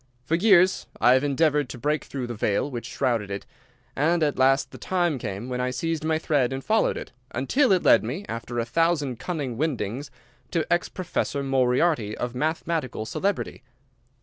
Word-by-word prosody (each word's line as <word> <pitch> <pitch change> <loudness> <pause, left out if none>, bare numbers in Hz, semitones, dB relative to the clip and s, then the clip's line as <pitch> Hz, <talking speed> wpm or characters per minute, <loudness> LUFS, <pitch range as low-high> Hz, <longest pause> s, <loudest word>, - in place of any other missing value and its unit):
For 155 - -2
years 185 0 +4
I 125 +2 +6
have 130 +1 +3
endeavoured 145 -1 +2
to - - -7
break 150 +5 -1
through 135 -3 -4
the 120 - -5
veil 105 +5 0
which 120 -2 -5
shrouded 115 -5 -1
it, 100 0 -5 0.5
and 165 +4 +2
at 145 -3 0
last 135 +1 +3
the - - -11
time 175 -6 0
came 105 0 -5
when 125 -1 -2
I 125 - 0
seized 155 +5 -2
my 160 0 +1
thread 145 -5 +1
and 135 0 -5
followed 220 0 +2
it, - - -7 0.2
until 245 - +2
it 185 -2 +3
led - - +6
me, 145 - -4
after 115 +1 -5
a 115 - 0
thousand 145 -2 +1
cunning 145 -9 -3
windings, 135 -2 -2 0.4
to 165 -3 0
ex 175 - 0
Professor 175 -6 -2
Moriarty 130 -3 +1
of 120 -1 -3
mathematical 155 -3 -2
celebrity. 195 - -2
140 Hz, 180 wpm, -25 LUFS, 125-165 Hz, 0.5 s, I